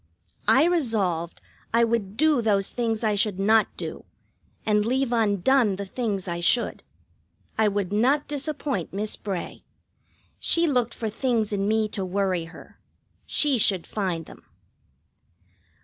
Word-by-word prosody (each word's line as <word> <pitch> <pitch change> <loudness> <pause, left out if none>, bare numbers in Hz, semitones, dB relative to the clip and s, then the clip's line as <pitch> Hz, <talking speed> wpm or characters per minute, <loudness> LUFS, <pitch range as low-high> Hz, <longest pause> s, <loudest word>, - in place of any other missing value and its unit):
I 270 - +6
resolved 210 - 0 0.3
I 235 - +5
would 225 -3 -1
do 305 -4 +3
those 200 -3 +1
things 230 -2 -1
I 215 -1 +2
should 205 -1 0
not 215 +2 +4
do, - - -6 0.6
and 210 -1 +2
leave 255 +2 0
undone 220 +1 +2
the 200 +1 -5
things 200 -3 -3
I 170 -1 -3
should. 205 +8 +1 0.7
I 220 -1 +3
would 200 -2 -1
not 260 +8 +2
disappoint 285 - -3
Miss 210 +2 -1
Bray. 195 -4 -6 0.8
She 335 0 +3
looked 250 -6 0
for 220 -2 -3
things 225 -3 0
in 200 0 0
me 220 0 +2
to 195 - -4
worry 185 -2 -1
her. 165 - -14 0.5
She 285 -5 +2
should 190 -4 +2
find 180 -6 -3
them. - - -14
215 Hz, 140 wpm, -25 LUFS, 195-245 Hz, 0.8 s, I